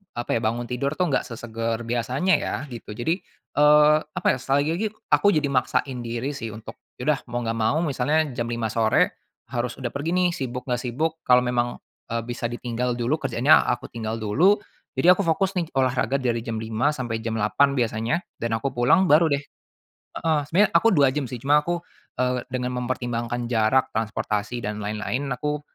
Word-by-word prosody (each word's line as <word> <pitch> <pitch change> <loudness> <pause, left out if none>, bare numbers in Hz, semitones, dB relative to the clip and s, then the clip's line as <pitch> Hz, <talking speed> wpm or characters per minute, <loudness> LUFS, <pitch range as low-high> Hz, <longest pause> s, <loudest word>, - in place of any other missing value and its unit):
apa 120 0 -5
ya, - - +2
bangun 115 +2 0
tidur 125 +3 -1
tuh 180 -1 +1
enggak - - +1
sesegar 115 -1 -4
biasanya 125 +10 0
ya," - - -1 0.2
gitu 115 -3 -8
jadi, 140 +9 0 0.4
eee, 150 +1 +6 0.2
apa - - -1
ya, - - -5
sekali 135 +2 +1
lagi 215 +5 -1 0.2
aku - - +4
jadi 150 -2 +2
maksain 130 -1 0
diri 120 +4 -3
sih 115 -5 -5
untuk, 110 +1 -10 0.2
ya 125 - -5
udah, 135 - 0
mau 120 - -1
enggak 115 0 -2
mau 110 +8 +2
misalnya 150 +2 +1
jam 120 -2 -2
5.00 115 -1 -1
sore 110 0 +2 0.4
harus 120 -1 -2
udah 130 - -3
pergi 145 +4 -3
nih, 180 -1 +3
sibuk 125 -1 -5
enggak 125 0 -1
sibuk 150 +7 -1
kalau 125 0 +6
memang, 120 -1 -1 0.3
eee, 115 0 0
bisa 120 -1 -3
ditinggal 120 +1 -2
dulu 120 +6 +1
kerjaannya 135 +2 +5 0.2
aku - - -3
tinggal 115 -1 -4
dulu, 165 - +3 0.4
jadi 180 +5 +7
aku 200 - -1
fokus 185 +4 +1
nih 170 -2 -2
olahraga 130 -1 +1
dari 120 -3 -1
jam 115 -1 -4
5.00 110 +6 0
sampai 120 -6 -3
jam 115 -1 -2
8.00 105 +7 +3
biasanya 115 +5 0 0.2
dan 115 0 -2
aku 135 +1 -2
pulang 125 +10 +4
baru 160 +2 +6
deh 140 0 0 0.7
heeh. 160 -2 +1
Sebenarnya 200 +4 +4
aku 230 - +5
2 140 -3 +5
jam 145 -2 -2
sih 125 - -5
cuma 145 +5 +4
aku, 175 +2 -1 0.4
eee, 125 -1 0
dengan 125 0 -2
mempertimbangkan 120 -1 -2
jarak, 120 +2 +2
transportasi 110 +1 -2
dan 105 +1 -3
lain-lain 110 +6 -3
aku, 150 +3 -2
125 Hz, 190 wpm, -24 LUFS, 115-145 Hz, 0.7 s, jadi